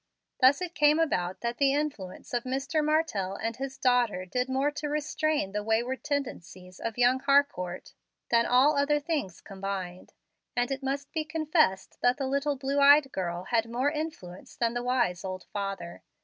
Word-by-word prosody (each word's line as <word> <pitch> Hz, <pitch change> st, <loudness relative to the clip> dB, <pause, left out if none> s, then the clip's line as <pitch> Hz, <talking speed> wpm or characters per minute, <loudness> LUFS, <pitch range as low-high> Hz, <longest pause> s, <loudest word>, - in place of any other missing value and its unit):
Thus 275 Hz, +6 st, +5 dB
it 350 Hz, -1 st, -5 dB
came 300 Hz, -1 st, +4 dB
about 185 Hz, -, 0 dB
that 235 Hz, 0 st, -3 dB
the 275 Hz, -1 st, +3 dB
influence 275 Hz, -13 st, -4 dB
of 240 Hz, -1 st, 0 dB
Mr. 275 Hz, +4 st, -1 dB
Martell 300 Hz, -, 0 dB
and 225 Hz, +2 st, -3 dB
his 270 Hz, 0 st, -5 dB
daughter 245 Hz, -7 st, +2 dB
did 250 Hz, +7 st, -2 dB
more 270 Hz, +3 st, +1 dB
to 295 Hz, 0 st, -4 dB
restrain 300 Hz, -5 st, -1 dB
the 210 Hz, +1 st, -2 dB
wayward 235 Hz, +3 st, -1 dB
tendencies 185 Hz, -, -5 dB
of 230 Hz, 0 st, -4 dB
young 250 Hz, +1 st, +4 dB
Harcourt 275 Hz, -11 st, +1 dB, 0.4 s
than 235 Hz, 0 st, +4 dB
all 265 Hz, +5 st, +4 dB
other 285 Hz, +1 st, +2 dB
things 290 Hz, -, -3 dB
combined; 190 Hz, -2 st, -6 dB, 0.4 s
and 245 Hz, +1 st, 0 dB
it 270 Hz, 0 st, -3 dB
must 275 Hz, +1 st, -3 dB
be 320 Hz, -2 st, -1 dB
confessed 310 Hz, -, 0 dB
that 245 Hz, +2 st, +3 dB
the 275 Hz, -, -2 dB
little 280 Hz, +2 st, 0 dB
blue 275 Hz, +1 st, -1 dB
eyed 280 Hz, -1 st, +6 dB
girl 175 Hz, -1 st, -3 dB
had 225 Hz, +3 st, 0 dB
more 255 Hz, +5 st, 0 dB
influence 300 Hz, -, -6 dB
than 235 Hz, -1 st, 0 dB
the 240 Hz, -, -2 dB
wise 240 Hz, -8 st, 0 dB
old 185 Hz, -1 st, -5 dB
father. 195 Hz, -4 st, -5 dB
255 Hz, 175 wpm, -28 LUFS, 200-285 Hz, 0.4 s, eyed